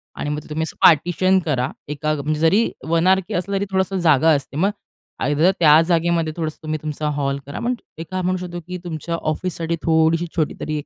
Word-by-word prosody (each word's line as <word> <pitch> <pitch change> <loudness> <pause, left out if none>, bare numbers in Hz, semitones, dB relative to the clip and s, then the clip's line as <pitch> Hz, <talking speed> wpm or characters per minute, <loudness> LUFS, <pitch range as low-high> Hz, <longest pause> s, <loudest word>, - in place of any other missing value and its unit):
आणि 145 - -4
मग 150 0 -2
तुम्ही 155 +1 -2
असं 160 - -5
पार्टिशन 175 +4 +4
करा. 130 -5 0 0.2
एका 150 +1 -1
म्हणजे 150 +1 -2
जरी 185 +8 +3 0.2
वन 165 +2 +2
आरके 190 -1 +2
असलं. 195 +3 -1
तरी 200 - -1
थोडासा 190 0 0
जागा 160 -2 +4
असते. 140 0 -5
मग 195 +6 +2 0.5
आयदर 150 +6 +3
त्या 155 -1 +7
जागेमध्ये 170 -2 +1
थोडंसं 155 -2 -3
तुम्ही 155 0 -3
तुमचा 150 0 -3
हॉल 140 0 -1
करा. 140 - -6
पण 245 +1 -1 0.2
एका 165 +3 -4
म्हणू 185 +1 0
शकतो 175 0 -6
की 180 0 -5
तुमच्या 165 -1 -4
ऑफिससाठी 165 +1 -2
थोडीशी 160 +1 +2
छोटी 160 -3 0
तरी 155 0 -3
एक 150 - -6
165 Hz, 200 wpm, -21 LUFS, 155-180 Hz, 0.5 s, त्या